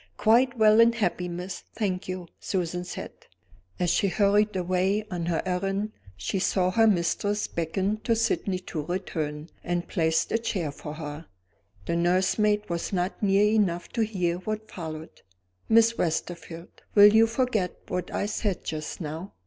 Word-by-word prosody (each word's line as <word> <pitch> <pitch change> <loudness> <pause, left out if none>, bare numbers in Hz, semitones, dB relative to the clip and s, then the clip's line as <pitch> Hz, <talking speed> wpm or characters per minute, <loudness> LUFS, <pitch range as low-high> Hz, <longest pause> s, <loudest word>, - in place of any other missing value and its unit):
"Quite 245 +3 +4
well 215 0 +6
and 235 0 +5
happy, 180 -5 -1
miss, 180 +2 -5 0.2
thank 190 -5 -2
you," 185 -1 -5
Susan 180 -2 -2
said. 180 - -6 0.7
As 175 -2 +2
she 200 - +2
hurried 205 +2 +2
away 185 +3 0
on 170 -2 -3
her 170 -2 0
errand, 195 +3 -1 0.3
she 145 - -2
saw 185 0 +1
her 225 +3 +4
mistress 205 +2 +1
beckon 185 +5 -1
to 230 - +3
Sydney 220 -4 0
to 165 -3 -4
return, 155 -2 -4
and 175 -1 -2
place 160 -3 +1
a 225 - +2
chair 190 -9 -2
for 150 +1 -8
her. 150 0 -7 0.6
The 170 - -1
nursemaid 190 +4 +2
was 170 -1 -3
not 180 0 -2
near 200 0 +4
enough 200 -5 +1
to 230 - -2
hear 180 -5 -1
what 215 +3 -5
followed. 160 -2 -7 0.5
"Miss 230 +1 +5
Westerfield, 170 0 -4
will 205 0 +9
you 225 +1 +6
forget 225 -5 -1
what 180 -1 -3
I - - -1
said 205 -2 -2
just 155 +3 -5
now?" 160 +4 -6
185 Hz, 155 wpm, -26 LUFS, 170-210 Hz, 0.7 s, will